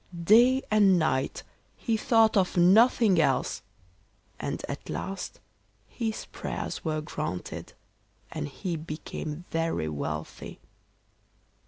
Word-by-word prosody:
Day 245 Hz, +8 st, +6 dB
and 200 Hz, -3 st, +5 dB
night 135 Hz, -5 st, 0 dB, 0.3 s
he 230 Hz, -, -1 dB
thought 225 Hz, -2 st, +3 dB
of 185 Hz, -2 st, +2 dB
nothing 200 Hz, +1 st, +5 dB
else, -, -, 0 dB, 0.8 s
and -, -, -4 dB
at -, -, -7 dB
last 195 Hz, 0 st, -5 dB, 0.5 s
his 225 Hz, -3 st, -4 dB
prayers -, -, -5 dB
were 155 Hz, -1 st, -1 dB
granted, 150 Hz, -10 st, -5 dB, 0.6 s
and 75 Hz, -, -4 dB
he 180 Hz, -, -4 dB
became 155 Hz, +1 st, -6 dB
very 165 Hz, -, -1 dB
wealthy. 75 Hz, -2 st, -5 dB
180 Hz, 105 wpm, -28 LUFS, 155-220 Hz, 0.8 s, Day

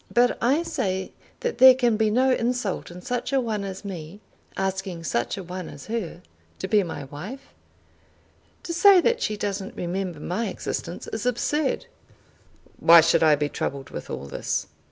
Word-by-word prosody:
"But 245 Hz, +1 st, +3 dB
I 275 Hz, +8 st, +2 dB
say 190 Hz, -, -2 dB, 0.3 s
that 485 Hz, -1 st, -2 dB
there 260 Hz, 0 st, +10 dB
can 240 Hz, -3 st, +2 dB
be 215 Hz, 0 st, +2 dB
no 255 Hz, +4 st, +3 dB
insult 240 Hz, -5 st, -1 dB
in 180 Hz, +1 st, -10 dB
such 250 Hz, +1 st, -3 dB
a 270 Hz, -, +3 dB
one 220 Hz, -5 st, -2 dB
as 195 Hz, +1 st, -7 dB
me 180 Hz, -1 st, -7 dB, 0.4 s
asking 190 Hz, -3 st, -3 dB
such 120 Hz, -3 st, -1 dB
a 195 Hz, -, -5 dB
one 180 Hz, 0 st, -6 dB
as 140 Hz, -, -11 dB
her 205 Hz, -6 st, -4 dB, 0.3 s
to 190 Hz, -, -4 dB
be 210 Hz, +1 st, +4 dB
my 170 Hz, -5 st, -5 dB
wife. 185 Hz, -, -9 dB, 1.1 s
To 335 Hz, -, -4 dB
say 380 Hz, +2 st, +7 dB
that 470 Hz, +6 st, +1 dB
she 215 Hz, -, -1 dB
doesn't 200 Hz, -1 st, -4 dB
remember 180 Hz, -2 st, -3 dB
my 210 Hz, +9 st, -2 dB
existence 175 Hz, -2 st, -5 dB
is 220 Hz, +2 st, -2 dB
absurd." 285 Hz, -, 0 dB, 0.9 s
"Why 170 Hz, 0 st, +8 dB
should 165 Hz, -, +3 dB
I 155 Hz, -2 st, +6 dB
be 145 Hz, 0 st, -1 dB
troubled 140 Hz, -2 st, -4 dB
with -, -, -7 dB
all -, -, -5 dB
this?" 70 Hz, -, -2 dB
200 Hz, 175 wpm, -25 LUFS, 175-245 Hz, 1.1 s, there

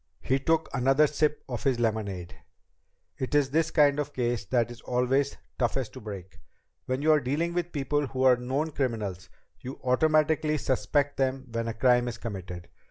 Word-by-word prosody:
He 135 Hz, +1 st, +1 dB
took 160 Hz, +3 st, +1 dB
another 135 Hz, +3 st, +4 dB
sip 150 Hz, 0 st, 0 dB
of 120 Hz, -4 st, -5 dB
his 130 Hz, -3 st, +1 dB
lemonade. 105 Hz, -6 st, -2 dB, 0.8 s
"It 130 Hz, +2 st, -2 dB
is 140 Hz, -2 st, +3 dB
this 160 Hz, +2 st, +2 dB
kind 145 Hz, -2 st, +4 dB
of 145 Hz, 0 st, -3 dB
case 120 Hz, -3 st, -1 dB
that 120 Hz, +2 st, +1 dB
is 120 Hz, -, -11 dB
always 130 Hz, +3 st, 0 dB, 0.2 s
toughest 125 Hz, 0 st, -1 dB
to -, -, -9 dB
break. 100 Hz, -4 st, -8 dB, 0.5 s
Where 130 Hz, +1 st, -1 dB
you 155 Hz, +2 st, +3 dB
are 155 Hz, -, +5 dB
dealing 150 Hz, +6 st, -1 dB
with 175 Hz, 0 st, -2 dB
people 145 Hz, 0 st, -1 dB
who 130 Hz, +1 st, -2 dB
are 130 Hz, -1 st, +7 dB
known 135 Hz, +6 st, -2 dB
criminals, 105 Hz, -, -3 dB, 0.3 s
you 130 Hz, +7 st, -8 dB
automatically 155 Hz, +3 st, +2 dB
suspect 140 Hz, +1 st, 0 dB
them 135 Hz, 0 st, 0 dB
when 115 Hz, 0 st, -2 dB
a 115 Hz, -, -3 dB
crime 125 Hz, +1 st, +3 dB
is 120 Hz, -1 st, -4 dB
committed. 95 Hz, -6 st, -7 dB
130 Hz, 175 wpm, -28 LUFS, 120-145 Hz, 0.8 s, are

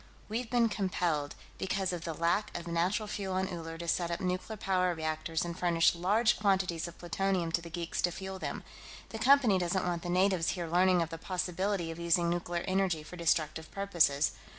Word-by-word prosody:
We've 225 Hz, +2 st, -3 dB
been 240 Hz, -2 st, +3 dB
compelled, 175 Hz, -8 st, -1 dB, 0.2 s
because 190 Hz, -1 st, -1 dB
of 175 Hz, -1 st, -5 dB
the 165 Hz, -, -2 dB
lack 170 Hz, +6 st, 0 dB
of 170 Hz, -, -7 dB
natural 175 Hz, +6 st, 0 dB
fuel 195 Hz, -2 st, -3 dB
on 190 Hz, 0 st, 0 dB
Uller, 165 Hz, -2 st, -6 dB
to 170 Hz, 0 st, -6 dB
set 170 Hz, 0 st, +1 dB
up 170 Hz, -, -2 dB
nuclear 185 Hz, +4 st, -2 dB
power 185 Hz, -2 st, +1 dB
reactors 160 Hz, +1 st, -2 dB
and 170 Hz, -1 st, -4 dB
furnish 170 Hz, -2 st, +3 dB
large 205 Hz, +6 st, +2 dB
quantities 190 Hz, -5 st, +1 dB
of 170 Hz, -, -11 dB
plutonium 180 Hz, -1 st, -1 dB
to 170 Hz, -, +1 dB
the 170 Hz, -, -9 dB
geeks 170 Hz, 0 st, -3 dB
to 175 Hz, -, +2 dB
fuel 190 Hz, +2 st, -6 dB
them. -, -, -4 dB, 0.5 s
The 225 Hz, -, -6 dB
Company 245 Hz, -5 st, +5 dB
doesn't 180 Hz, +1 st, 0 dB
want 175 Hz, -1 st, -1 dB
the 175 Hz, -, -5 dB
natives 185 Hz, -1 st, +2 dB
here 175 Hz, -, -2 dB
learning 180 Hz, +1 st, +3 dB
of 165 Hz, -, -7 dB
the 165 Hz, -, -6 dB
possibility 185 Hz, 0 st, -2 dB
of 165 Hz, -, -8 dB
using 170 Hz, 0 st, +2 dB
nuclear 175 Hz, 0 st, -2 dB
energy 185 Hz, -4 st, +1 dB
for 165 Hz, -, -10 dB
destructive 160 Hz, -2 st, 0 dB
purposes. 170 Hz, -8 st, +2 dB
175 Hz, 195 wpm, -31 LUFS, 170-190 Hz, 0.5 s, Company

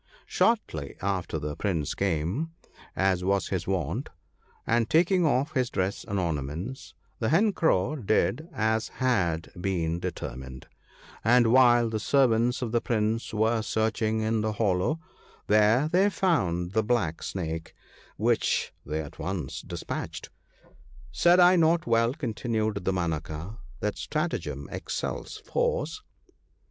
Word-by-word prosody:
Shortly 80 Hz, -, 0 dB
after 95 Hz, -4 st, -2 dB
the 75 Hz, 0 st, -4 dB
Prince 85 Hz, -8 st, -1 dB
came, 100 Hz, -, -1 dB, 0.4 s
as 95 Hz, -2 st, +1 dB
was 95 Hz, -1 st, +1 dB
his -, -, -2 dB
wont, -, -, -2 dB, 0.6 s
and 115 Hz, 0 st, +1 dB
taking 175 Hz, +1 st, +4 dB
off 140 Hz, +1 st, +1 dB
his 130 Hz, -3 st, +1 dB
dress 95 Hz, +1 st, -2 dB
and 100 Hz, -, -3 dB
ornaments, 85 Hz, -, -4 dB, 0.2 s
the 110 Hz, -, 0 dB
Hen 200 Hz, +8 st, +3 dB
Crow 155 Hz, -, +1 dB
did 140 Hz, -, 0 dB
as 110 Hz, -3 st, 0 dB
had 90 Hz, -11 st, +1 dB
been 85 Hz, -3 st, -1 dB
determined; 65 Hz, -7 st, -6 dB, 0.6 s
and 120 Hz, 0 st, +5 dB
while 120 Hz, -2 st, +6 dB
the 110 Hz, -1 st, -2 dB
servants 125 Hz, 0 st, +2 dB
of 115 Hz, -, -3 dB
the 120 Hz, 0 st, +2 dB
Prince 110 Hz, -1 st, -1 dB
were 110 Hz, +1 st, +1 dB
searching 110 Hz, 0 st, 0 dB
in 110 Hz, 0 st, +1 dB
the 110 Hz, 0 st, -1 dB
hollow, 105 Hz, -, +1 dB, 0.5 s
there 110 Hz, +7 st, +4 dB
they 185 Hz, +5 st, +3 dB
found 90 Hz, -, 0 dB
the 110 Hz, +2 st, +2 dB
Black 105 Hz, -8 st, 0 dB
Snake, 80 Hz, -3 st, -4 dB, 0.4 s
which -, -, +1 dB
they 75 Hz, +2 st, -3 dB
at 75 Hz, -, -10 dB
once 85 Hz, -7 st, -4 dB
dispatched. -, -, -6 dB, 0.4 s
' -, -, -27 dB, 0.3 s
Said 175 Hz, -, +4 dB
I 180 Hz, +1 st, +7 dB
not 165 Hz, 0 st, +3 dB
well,' 115 Hz, +2 st, +2 dB
continued 110 Hz, -5 st, -2 dB
Damanaka, 85 Hz, +2 st, -3 dB
* -, -, -21 dB
that 105 Hz, -1 st, -2 dB
stratagem 155 Hz, +3 st, -3 dB
excels -, -, -4 dB
force 485 Hz, -3 st, -1 dB
110 Hz, 135 wpm, -27 LUFS, 90-130 Hz, 0.6 s, I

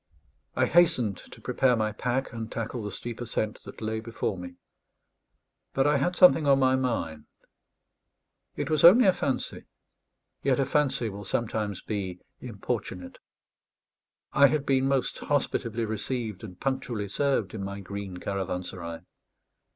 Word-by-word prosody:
I -, -, +3 dB
hastened 125 Hz, -, +3 dB
to -, -, -13 dB
prepare 125 Hz, -2 st, +2 dB
my 110 Hz, -1 st, 0 dB
pack, 125 Hz, +5 st, -2 dB
and 115 Hz, -1 st, -5 dB
tackle 115 Hz, +1 st, -4 dB
the 105 Hz, -1 st, -4 dB
steep 120 Hz, +2 st, -6 dB
ascent 110 Hz, -2 st, -2 dB
that -, -, -10 dB
lay 110 Hz, 0 st, -1 dB
before 110 Hz, -2 st, -3 dB
me; 90 Hz, -1 st, -8 dB, 1.2 s
but 135 Hz, -, +2 dB
I 145 Hz, 0 st, +4 dB
had 175 Hz, +6 st, 0 dB
something 165 Hz, -5 st, +6 dB
on 140 Hz, -1 st, +6 dB
my 130 Hz, -1 st, +4 dB
mind. 115 Hz, -12 st, -2 dB, 1.3 s
It -, -, -3 dB
was 155 Hz, -2 st, +2 dB
only 200 Hz, +9 st, +9 dB
a 190 Hz, -, +6 dB
fancy; 135 Hz, -6 st, -3 dB, 0.8 s
yet 135 Hz, -1 st, +2 dB
a 135 Hz, -, +3 dB
fancy 135 Hz, -3 st, +1 dB
will 100 Hz, -1 st, -6 dB
sometimes 105 Hz, -1 st, -2 dB
be 95 Hz, -4 st, -4 dB, 0.2 s
importunate. 105 Hz, -5 st, -5 dB, 1.1 s
I 140 Hz, -, +7 dB
had 150 Hz, 0 st, 0 dB
been 135 Hz, -1 st, +2 dB
most 135 Hz, -1 st, 0 dB
hospitably 115 Hz, -5 st, -1 dB
received 110 Hz, -1 st, -3 dB
and 90 Hz, -4 st, -9 dB
punctually 125 Hz, -6 st, -2 dB
served 135 Hz, -2 st, 0 dB
in 105 Hz, -3 st, -4 dB
my 100 Hz, +1 st, -5 dB
green 100 Hz, -1 st, -6 dB
caravanserai. 90 Hz, -3 st, -4 dB
115 Hz, 145 wpm, -27 LUFS, 100-135 Hz, 1.3 s, only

